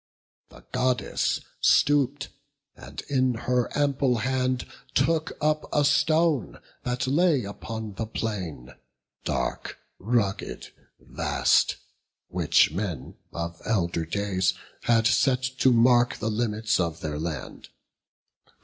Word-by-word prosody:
The - - -16
Goddess 125 0 0 0.2
stoop'd, 145 -1 +3 0.5
and - - -9
in 130 -3 +1
her 125 +1 0
ample 140 -3 +2
hand 130 +1 0 0.3
Took 160 +4 +1
up 155 0 0
a 145 -1 +3
stone, 150 -1 +2 0.2
that 125 +1 -2
lay 145 0 +3
upon 110 +1 -6
the 110 +3 -4
plain, 90 - -4 0.5
Dark, - - -2 0.2
rugged, 105 -2 -1 0.3
vast, - - +1 0.5
which - - +3
men 90 -5 -4 0.2
of 85 0 -5
elder 85 -6 0
days 95 -1 0 0.3
Had 115 -1 +3
set 130 +2 +3 0.2
to 130 - +5
mark 120 +1 +4
the 110 0 -2
limits 110 -1 0
of 85 -3 -2
their 75 -1 -3
land. 80 -2 -6
120 Hz, 110 wpm, -26 LUFS, 100-135 Hz, 0.5 s, to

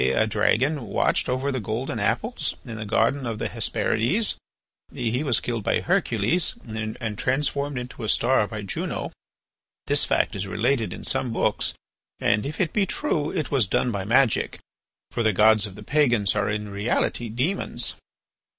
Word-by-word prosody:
A 65 +12 +3
dragon 115 +5 +1
watched 100 - +1
over 130 +3 0
the 130 - -1
golden 115 +4 -3
apples - - -1
in 115 -2 -6
the 110 - -5
garden 120 +5 +1
of 115 -2 -3
the - - -2
Hesperides. 130 - 0 0.6
He 120 +3 -1
was 130 -7 +2
killed 115 -3 -3
by - - +2
Hercules 115 - +1
and 110 0 -4
transformed 140 +1 0
into 125 -1 -6
a 110 - -2
star 120 -3 +3
by 110 -1 -6
Juno. 95 - -4 0.7
This - - +2
fact - - +1
is 100 0 -3
related 115 +3 0
in - - -7
some 130 -2 +1
books, 115 - 0 0.4
and 105 +4 +2
if 150 - -6
it 170 -5 0
be 200 -2 +2
true, 160 - 0
it 160 -5 -3
was 130 -8 +3
done 120 +6 +1
by 100 -3 -2
magic, 120 +3 +2 0.5
for - - -1
the 110 -2 +3
gods 110 +1 +5
of 95 - -11
the 105 - -10
pagans 120 -7 +2
are 105 -1 +1
in 105 0 -2
reality 105 +3 0
demons. 130 - -1
115 Hz, 170 wpm, -25 LUFS, 105-135 Hz, 0.7 s, gods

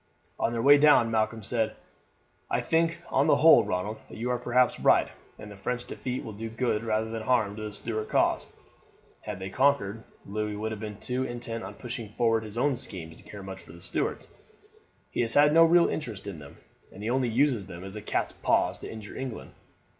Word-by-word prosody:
On - - +1
their 115 -1 -2
way 145 +1 +8
down 145 -6 +5
Malcolm 110 0 0
said: 110 +1 0 0.7
"I - - +1
think, 165 +1 0
on - - +3
the - - +6
whole, - - +7
Ronald, 90 +4 -3
that - - -10
you 120 +3 -2
are 125 - 0
perhaps 125 +1 +2
right, - - +4 0.3
and 105 - -10
the - - -9
French 120 +5 -3
defeat 125 0 -4
will 110 - -7
do 115 +2 -6
good 115 -1 -1
rather 110 0 -1
than 115 -1 -4
harm 110 -3 +1
to 110 - -7
the 105 0 -5
Stuart 110 +1 -4
cause. - - +2 0.7
Had 105 -2 -6
they 95 0 -6
conquered, 115 -4 +1 0.2
Louis 105 +1 -3
would 110 +2 -3
have 110 -1 -6
been 105 -2 -6
too 125 +1 -1
intent 120 -2 -4
on - - -8
pushing 120 -3 -6
forward 115 0 +1
his 105 +1 -7
own 135 +1 +2
schemes 80 -8 -8
to - - -16
care 100 -1 -9
much 95 0 -8
for - - -14
the 85 - -12
Stuarts. 90 0 -2 0.8
He - - 0
has 115 -1 +2
no 150 +3 +7
real 170 +1 +5
interest 110 -10 -4
in 100 -6 -6
them, 70 -1 -12 0.3
and 105 +3 -7
only 125 0 +1
uses 120 -4 +1
them 90 -1 -9
as 95 +1 -8
cat's - - 0
paws - - +1
to - - -8
injure 110 -2 -9
England. 130 -4 -6
110 Hz, 205 wpm, -28 LUFS, 105-125 Hz, 0.8 s, way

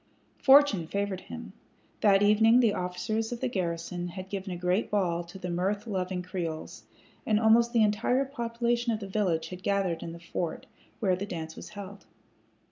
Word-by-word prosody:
Fortune 265 - +6
favored 200 0 -2
him. - - -9 0.5
That 200 -1 +5
evening 220 +3 +5
the 230 -4 +4
officers 180 +6 -2
of 240 - -4
the 260 - -1
garrison 175 -4 -3
had 185 +1 -8
given 195 -1 -4
a 175 - -4
great 180 +4 0
ball 175 -4 0
to 175 +3 -11
the 180 -1 -5
mirth 195 +5 -1
loving 185 -4 -2
Creoles, 175 -4 -5 0.4
and 215 -1 +2
almost 230 +1 +5
the 230 -3 +4
entire 225 +6 +2
population 235 -2 -1
of 220 - -1
the 200 - -6
village 190 -5 0
had 180 0 -8
gathered 195 -4 0
in 165 - -5
the 170 - -9
fort, 170 -1 -4 0.3
where 190 -4 +2
the 195 +3 -5
dance 160 -4 -6
was - - -9
held. 200 0 -9
195 Hz, 180 wpm, -29 LUFS, 180-220 Hz, 0.5 s, Fortune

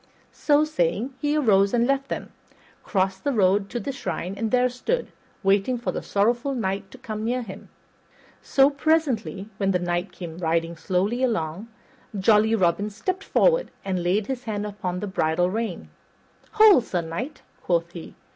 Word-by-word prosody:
So 295 0 +3
saying, 225 - -1
he 295 +1 +1
arose 200 -7 +3
and 235 0 +3
left 275 +1 0
them, - - -5 0.5
crossed 190 -1 -1
the 285 - +1
road 200 -3 +2
to 240 - -3
the 275 - -4
shrine, 195 -8 -4
and 220 +2 -2
there 250 +2 +3
stood, 250 - -2 0.3
waiting 200 +6 +2
for 240 - -2
the - - -4
sorrowful 235 +7 0
knight 195 -3 -2
to - - -13
come 215 -4 -6
near 245 +2 -1
him. 195 -2 -10 0.7
So, 275 +1 +4
presently, 280 -10 0
when 195 -1 0
the 185 - +3
knight 175 +1 -2
came 170 -2 -8
riding 165 0 0
slowly 195 +9 -1
along, 210 -5 -1 0.5
jolly 215 +3 +4
Robin 195 +1 +1
stepped 370 - -3
forward - - +2 0.2
and 185 -2 -1
laid 190 +4 +1
his 255 0 -5
hand 210 -2 -3
upon 190 -3 -4
the - - -2
bridle 175 -1 +1
rein. 220 -4 -4 0.6
"Hold, 420 - +7
Sir 180 -5 -1
Knight," 210 - -6 0.2
quoth 170 -1 0
he. 170 -2 -10
210 Hz, 165 wpm, -24 LUFS, 185-250 Hz, 0.7 s, Hold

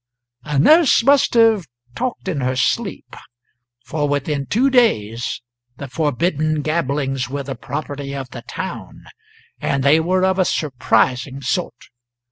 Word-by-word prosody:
A 150 -2 -2
nurse 305 - +5
must 275 -1 +3
have 225 -7 +4 0.3
talked 250 - -4
in 160 -7 -2
her 130 0 -1
sleep, 200 - -2 0.7
for 145 +1 -2
within 145 0 -2
two 260 +5 +2
days 120 - +1 0.3
the 140 - -7
forbidden 155 +1 -1
gabblings 140 -5 -1
were 140 +1 -4
the 135 0 -5
property 140 +2 -6
of 135 -2 -6
the - - -8
town; - - -7 0.6
and 135 -1 -1
they 145 +3 +5
were 185 +3 +1
of 190 0 +1
a 185 - +3
surprising 130 -2 0
sort. 125 -1 -3
145 Hz, 135 wpm, -19 LUFS, 135-185 Hz, 0.7 s, nurse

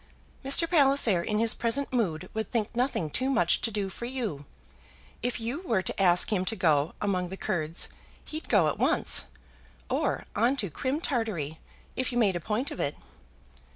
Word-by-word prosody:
"Mr. 275 +5 +4
Palliser 275 - +4
in 210 +4 -1
his 225 0 +3
present 260 +4 0
mood 185 -8 0
would 220 0 -3
think 230 -1 -2
nothing 245 - 0
too 255 - -1
much 175 -11 +3
to - - +2
do 205 -2 -2
for 215 +5 -7
you. 225 - -4 0.8
If 245 +1 -1
you 235 +7 -3
were 225 - 0
to - - -2
ask 180 +3 +4
him 185 -3 +1
to 225 - -1
go 155 -5 +2
among 185 -3 -1
the 190 - -7
Kurds, 170 -5 -1 0.4
he'd 310 +1 -7
go 195 -8 +4
at 150 - -2
once; - - +3 0.7
or - - 0
on 235 +5 +3
to 200 -9 0
Crim 265 - -2
Tartary, 205 - -2 0.4
if 255 0 -1
you 240 - -2
made 205 -6 +3
a - - -1
point 215 - -2
of - - -7
it." - - -1
220 Hz, 185 wpm, -28 LUFS, 180-250 Hz, 0.8 s, Mr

